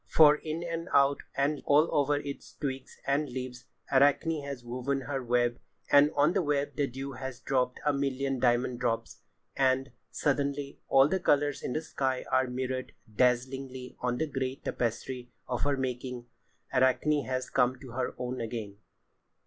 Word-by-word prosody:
For 150 -1 +7
in 155 +2 -4
and 165 0 -4
out, 140 0 +5 0.2
and 140 +2 +1
all 150 +3 +5
over 145 0 +3
its 145 -1 -6
twigs 135 -3 -5
and 140 +1 +1
leaves, 125 0 -6 0.3
Arachne 145 +3 +3
has 140 -3 -6
woven 130 +3 -2
her 135 0 -3
web, 120 0 +1 0.3
and 145 +1 +7
on 145 +4 +4
the 195 - +2
web 145 -2 0
the 145 -2 +1
dew 135 +2 -6
has 130 -1 -6
dropped 125 -2 0
a 150 - +3
million 135 -1 -1
diamond 120 0 +2
drops. 120 -2 -2 0.3
And, 135 0 +2 0.2
suddenly, 140 0 -1
all 135 0 +6
the 190 +4 0
colours 145 -4 +2
in - - -3
the 155 - -2
sky 130 -4 -1
are 130 0 +3
mirrored 130 +1 -3 0.2
dazzlingly 130 +1 0
on 125 -1 -1
the 160 - +1
grey 135 -3 -2
tapestry 125 0 -3 0.2
of 125 - -2
her 145 -1 +1
making. 125 -1 -3 0.5
Arachne 130 +3 +3
has 130 0 -3
come 130 0 +2
to 130 -2 -10
her 125 +1 -2
own 125 0 -3
again. 110 -3 -5
135 Hz, 165 wpm, -30 LUFS, 125-145 Hz, 0.5 s, For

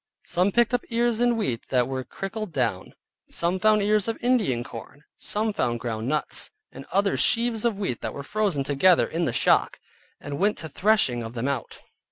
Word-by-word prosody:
Some 180 +3 +1
picked 240 +3 +2
up 245 - +2
ears 235 -1 +1
of 240 0 +3
wheat 130 - -2
that 125 -2 +2
were 130 -1 -3
crickled 195 - -6
down; 115 -10 -2 0.3
some 175 +2 0
found 215 0 +3
ears 210 0 +2
of 225 - -2
Indian 220 - +1
corn; 120 +5 -11
some 215 +1 -1
found 120 -9 -1
ground 115 -1 -4
nuts, 150 +2 0 0.2
and 135 +1 -11
others 200 +2 +1
sheaves 230 -1 +3
of 230 -4 +1
wheat 190 - -3
that - - -4
were 140 - -6
frozen 200 -5 0
together 150 +6 +4
in 165 +1 -2
the - - 0
shock, - - +2 0.4
and 145 0 -6
went 205 +1 +2
to 160 - -6
threshing 180 - +2
of 115 +1 -7
them 120 +3 -2
out. 140 -4 -3
180 Hz, 195 wpm, -25 LUFS, 130-215 Hz, 0.4 s, together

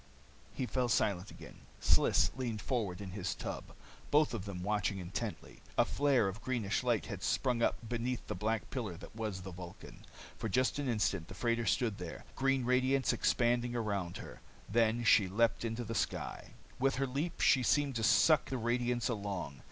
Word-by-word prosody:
He 130 - -1
fell 125 -1 0
silent 100 -3 +1
again. - - -12 0.2
Sliss - - +4
leaned 120 -5 -3
forward 105 -7 -2
in 95 -2 -6
his 90 -2 -3
tub. - - -5 0.4
Both 150 -1 +4
of 110 -4 -4
them 95 -3 -5
watched 105 -1 +1
intently. 95 -1 -5 0.2
A - - +5
flare 135 -7 +2
of 95 +3 -5
greenish 115 -4 -1
light 120 -4 +1
had 100 -2 -6
sprung 125 +1 +1
up 115 - 0
beneath 120 +2 -2
the - - -3
black 110 0 -2
pillar 110 -10 -3
that 100 - -12
was 105 -4 -3
the 95 - -7
Vulcan. 90 0 -10 0.4
For 110 - -2
just 130 +5 +1
an 140 -3 -1
instant 100 -7 0
the 95 - -9
freighter 115 +1 0
stood 115 -6 +1
there, 90 -2 -7
green 135 -1 +1
radiance 130 +2 +3
expanding 120 0 +1
around 100 -6 -2
her. - - -10 0.3
Then 115 +2 +2
she 105 -3 +6
leaped 115 +6 +1
into 115 +1 -2
the 115 0 -4
sky. - - -3 0.2
With 135 +1 +2
her 135 +1 +1
leap, 145 +6 -3
she 130 - +5
seemed 140 +1 +2
to 115 - -2
suck 120 +8 +5
the 130 - -1
radiance 120 +1 0
along. 100 - -3
115 Hz, 185 wpm, -34 LUFS, 100-125 Hz, 0.4 s, she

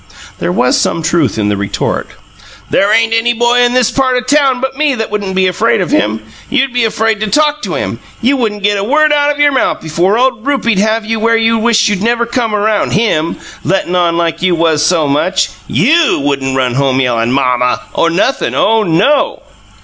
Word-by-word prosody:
(There - - -1
was 250 +8 +1
some 165 - -1
truth 155 - 0
in 105 -1 0
the 105 - 0
retort.) 100 0 -3 0.6
"There 200 +1 +2
ain't 225 +1 +2
any 225 +1 +1
boy 240 +1 +1
in 245 0 +2
this 250 -3 +2
part 260 -2 +1
of 250 - -3
town 275 -2 +2
but 265 +1 -3
me 290 -1 0
that 220 -3 -4
wouldn't 200 -3 -3
be 190 0 +2
afraid 190 +6 +1
of 180 - -2
him. 110 +1 0 0.3
You'd 270 0 0
be 245 -2 +1
afraid 220 -1 0
to 215 - -2
talk 300 +5 +1
to - - -4
him. - - -4 0.2
You 255 +4 +1
wouldn't 215 -6 -3
get 205 0 +1
a - - -2
word 300 +6 +2
out 290 0 +2
of 290 0 -2
your 290 0 +4
mouth 265 - 0
before 175 +6 0
old 255 -3 0
Rupie'd 245 -7 0
have 220 +2 0
you 225 0 -2
where 230 +1 +2
you'd 225 0 +1
wished 225 -1 +2
you 205 - 0
never 235 +4 0
come 235 -2 -2
around 210 0 0
HIM, 170 -7 0 0.3
lettin' 185 -1 -1
on 170 -2 +1
like 165 -1 -1
you 180 -1 +2
was 160 -2 +1
so 165 -4 +1
much! 150 +7 0 0.2
YOU 295 - +2
wouldn't 135 -2 -1
run 125 -2 0
home 135 0 0
yellin' 120 -2 0
'Mom 125 -2 +1
muh' 125 0 +1 0.2
or 165 - +1
nothin'! 195 +10 -1
OH, 225 +1 +2
no!" 200 - +1
215 Hz, 215 wpm, -12 LUFS, 165-245 Hz, 0.6 s, your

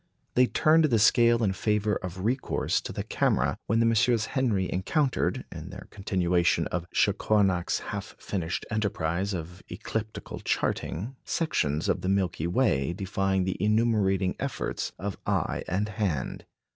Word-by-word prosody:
They 125 0 +5
turned 155 +4 +4
the 120 -7 +3
scale 115 +1 +5
in 95 -3 +2
favour 105 0 0
of 90 +1 -6
recourse 125 +3 0
to - - -6
the - - -4
camera - - +1
when 115 +2 +2
the 115 - +4
MM. 115 0 +3
Henry 115 -9 0
encountered, 130 - 0
in 80 +1 -8
their 95 +1 -9
continuation 90 -3 +1
of 90 0 -3
Chacornac's 100 -3 +2 0.2
half - - -6
finished 85 -3 -3
enterprise 100 -3 -1
of 85 +2 -7
ecliptical 110 +3 -5
charting, 115 +11 -2
sections 75 - 0
of 90 - +1
the 90 - -1
Milky 90 -4 0
Way 85 - +1
defying 95 0 0
the 95 +2 -2
enumerating 105 -4 +2
efforts - - -3
of 100 0 -5
eye - - 0
and 100 +4 0
hand. 100 - -2
100 Hz, 145 wpm, -27 LUFS, 90-115 Hz, 0.2 s, They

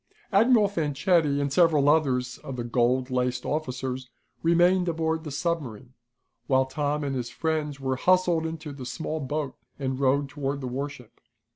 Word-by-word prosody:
Admiral 220 +1 +5
Fanchetti 155 -3 +1
and 140 -1 -1
several 155 -4 +4
others 130 -5 +2
of 135 - -7
the 120 - -3
gold 125 +2 +1
laced 125 0 -1
officers 130 -3 -3 0.3
remained 175 +2 +3
aboard 160 -1 -1
the 155 - -6
submarine, 140 - -3 0.5
while 130 -1 +3
Tom 145 +2 -2
and 140 -1 -2
his 125 -2 -3
friends 155 -3 -2
were 130 -1 -1
hustled 180 0 +3
into 160 -2 -6
the 140 -2 -8
small 160 +4 -4
boat 145 0 -3 0.2
and 130 -1 -3
rowed 140 +1 +2
toward 140 0 -3
the 130 - -4
warship. 135 -1 -6
145 Hz, 155 wpm, -26 LUFS, 130-160 Hz, 0.5 s, Admiral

